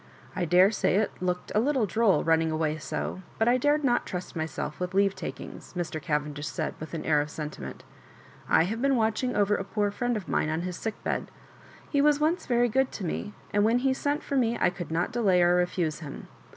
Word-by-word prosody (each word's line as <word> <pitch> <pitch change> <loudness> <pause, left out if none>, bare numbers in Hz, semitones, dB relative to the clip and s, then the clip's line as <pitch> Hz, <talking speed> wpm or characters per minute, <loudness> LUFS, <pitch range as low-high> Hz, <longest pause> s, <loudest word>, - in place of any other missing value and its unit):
I 180 - 0
daresay 185 +4 +4
it 215 +1 +2
looked 180 -1 -2
a 210 - +3
little 260 -1 +2
droll 215 0 +2
running 160 0 +3
away 155 -1 -1
so, 185 - -4 0.2
but 225 - +2
I 245 +1 +5
dared 290 +3 +2
not 245 -3 +2
trust 180 0 -5
myself 160 -1 -4
with 180 +1 -3
leavetakings," 195 0 -2
Mr. 170 -3 -3
Cavendish 150 0 -2
said, - - -3
with 155 +2 -6
an 160 - -5
air 150 -2 +3
of 150 - -4
sentiment 150 - -7 0.7
"I - - +5
have 220 +7 -3
been 275 0 +3
watching 225 +2 0
over 205 0 +3
a 195 - -2
poor 205 +1 -1
friend 245 +2 -1
of 195 - -7
mine 150 - 0
on 160 +1 -1
his 180 0 -4
sickbed. 220 +2 -3 0.6
He 285 - +1
was 295 0 +4
once 320 +4 0
very 245 -1 +3
good 265 +3 +1
to 195 - -5
me, 205 +5 -4 0.2
and 205 0 +3
when 225 +3 +4
he 260 +1 +2
sent 285 +2 -1
for 280 - -3
me 235 -3 +2
I - - +3
could 175 -3 -7
not 170 +5 0
delay 210 -7 +3
or 175 0 +4
refuse 175 -3 0
him. 150 -4 -8
195 Hz, 215 wpm, -27 LUFS, 165-240 Hz, 0.7 s, I